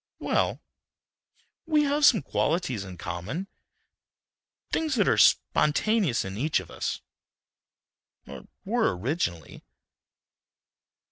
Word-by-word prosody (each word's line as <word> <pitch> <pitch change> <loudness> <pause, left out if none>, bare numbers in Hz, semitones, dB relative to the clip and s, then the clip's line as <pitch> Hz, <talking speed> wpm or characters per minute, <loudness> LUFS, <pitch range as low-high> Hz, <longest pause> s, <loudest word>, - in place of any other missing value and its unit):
"Well, - - 0 1.1
we 305 -2 +3
have 290 +1 +2
some 215 - +4
qualities 140 - -1
in 90 -2 -10
common. 90 - -5 1.2
Things 315 -4 0
that 205 -5 +2
are - - +4
spontaneous 160 - +2
in 95 +2 -6
each 150 -2 +1
of 90 -2 -11
us—or - - -11 0.2
were 90 - +1
originally." 90 - -3
150 Hz, 90 wpm, -26 LUFS, -, 1.2 s, some